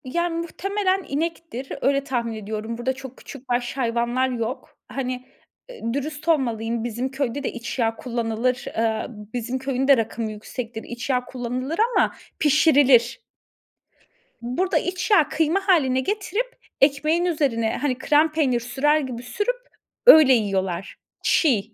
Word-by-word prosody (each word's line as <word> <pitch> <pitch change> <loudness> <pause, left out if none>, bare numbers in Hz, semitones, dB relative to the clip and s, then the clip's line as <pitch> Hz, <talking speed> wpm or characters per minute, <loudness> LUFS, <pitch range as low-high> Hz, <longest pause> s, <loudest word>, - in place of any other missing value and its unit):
Yani 340 +6 -1
muhtemelen 385 +2 -1
inektir. 315 -3 -4
Öyle 275 0 +2
tahmin 240 -4 -2
ediyorum. 220 +1 -5
Burada, 250 +2 -1
çok 265 -1 -10
küçükbaş 250 -2 -4
hayvanlar 240 +1 0
yok. 245 +1 -4
Hani, 255 -1 -4 0.6
ııı, 230 0 -2
dürüst 295 +3 -4
olmalıyım. 235 -7 0
Bizim 240 +3 -3
köyde 275 0 -2
de, - - -1
iç 240 +2 -6
yağı 225 -1 +1
kullanılır. 235 0 -1
Eee, 225 -1 0
bizim 235 +3 -5
köyün 265 0 -1
de 275 -2 +7
rakımı 225 0 -2
yüksektir. 225 +2 -6
İç 240 +3 -7
yağı 250 -1 +1
kullanılır 255 +5 -4 0.2
ama, - - +3 0.3
pişirilir. 280 - +4 1.2
Burada, 255 +11 0
iç 365 +3 -2
yağı 320 -8 +5
kıyma 330 +6 0
hâline 270 -9 +4
getirip, 420 - -2 0.3
ekmeğin 305 +5 +3
üzerine, 265 -10 0
hani, 265 -3 -1
krem 300 +4 +3
peynir 280 -6 +1
sürer 270 +6 +1
gibi 250 -4 -5
sürüp, 415 - -1 0.5
öyle 310 - +9
yiyorlar. 195 -5 -1 0.3
Çiğ. 225 - +2
260 Hz, 135 wpm, -23 LUFS, 235-305 Hz, 1.2 s, öyle